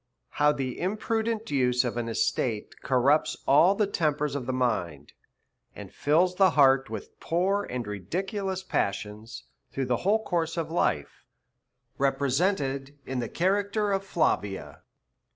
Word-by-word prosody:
How 150 Hz, 0 st, +6 dB
the 135 Hz, -4 st, -4 dB
imprudent 220 Hz, +3 st, -2 dB
use 125 Hz, -2 st, +2 dB
of 120 Hz, -, -2 dB
an 120 Hz, -1 st, -2 dB
Estate 115 Hz, -1 st, -1 dB
corrupts 135 Hz, +4 st, +2 dB
all 170 Hz, +8 st, +6 dB
the 210 Hz, -, +2 dB
tempers 150 Hz, -6 st, 0 dB
of 140 Hz, -4 st, -4 dB
the -, -, 0 dB
Mind, 90 Hz, -, -2 dB, 0.6 s
and -, -, -10 dB
fills 170 Hz, +5 st, +2 dB
the 190 Hz, -1 st, +6 dB
heart 135 Hz, -1 st, +5 dB
ivith 110 Hz, -2 st, -7 dB
poor 195 Hz, +4 st, 0 dB
and 125 Hz, -2 st, -3 dB
ridiculous 190 Hz, -, -3 dB
passions 105 Hz, -, -3 dB, 0.3 s
through 135 Hz, -, -2 dB
the 125 Hz, -1 st, +1 dB
whole 215 Hz, -, +1 dB
course 165 Hz, -3 st, -1 dB
of 160 Hz, -1 st, -2 dB
Life; 75 Hz, -, -1 dB, 0.7 s
represented 140 Hz, 0 st, 0 dB
in 130 Hz, -1 st, -3 dB
the 120 Hz, -, -3 dB
Character 200 Hz, +3 st, 0 dB
o/'Plavia. 170 Hz, -, -1 dB
145 Hz, 135 wpm, -27 LUFS, 125-190 Hz, 0.7 s, How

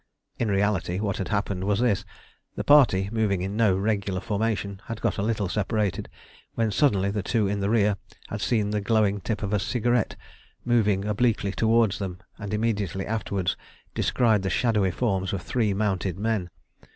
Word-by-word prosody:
In 115 Hz, -, 0 dB
reality, 100 Hz, -2 st, 0 dB
what 100 Hz, -2 st, -1 dB
had 95 Hz, -, -3 dB
happened 100 Hz, -3 st, -1 dB
was 100 Hz, 0 st, +1 dB
this: 105 Hz, -5 st, +1 dB, 0.5 s
the -, -, -3 dB
party, 125 Hz, -10 st, +5 dB
moving 105 Hz, -5 st, 0 dB
in 95 Hz, +2 st, -3 dB
no 105 Hz, -4 st, +3 dB
regular 100 Hz, -2 st, -1 dB
formation, 100 Hz, -2 st, -2 dB
had 115 Hz, -1 st, -5 dB
got -, -, -1 dB
a -, -, +1 dB
little 105 Hz, -2 st, 0 dB
separated, 105 Hz, +1 st, -1 dB, 0.5 s
when 115 Hz, -2 st, +1 dB
suddenly 100 Hz, -6 st, +2 dB
the 105 Hz, 0 st, -2 dB
two 105 Hz, +1 st, +1 dB
in 100 Hz, +1 st, -1 dB
the 100 Hz, 0 st, 0 dB
rear 105 Hz, -2 st, +3 dB, 0.3 s
had 105 Hz, -, -5 dB
seen 105 Hz, -2 st, +1 dB
the 105 Hz, -1 st, 0 dB
glowing 105 Hz, -2 st, +2 dB
tip 105 Hz, +2 st, -3 dB
of 100 Hz, +1 st, -2 dB
a 105 Hz, -, +2 dB
cigarette 120 Hz, +3 st, 0 dB, 0.5 s
moving 105 Hz, -5 st, +2 dB
obliquely 105 Hz, -1 st, +1 dB
towards 110 Hz, 0 st, +2 dB
them, 95 Hz, -3 st, -4 dB, 0.2 s
and 100 Hz, -1 st, -5 dB
immediately 105 Hz, -3 st, -1 dB
afterwards 100 Hz, -4 st, -1 dB, 0.4 s
descried 110 Hz, -5 st, +2 dB
the 95 Hz, -, -2 dB
shadowy 105 Hz, +2 st, +2 dB
forms 95 Hz, -2 st, -1 dB
of 90 Hz, -3 st, -3 dB
three 115 Hz, -5 st, 0 dB
mounted 95 Hz, -3 st, -1 dB
men. 105 Hz, -3 st, -1 dB
105 Hz, 175 wpm, -26 LUFS, 95-110 Hz, 0.5 s, party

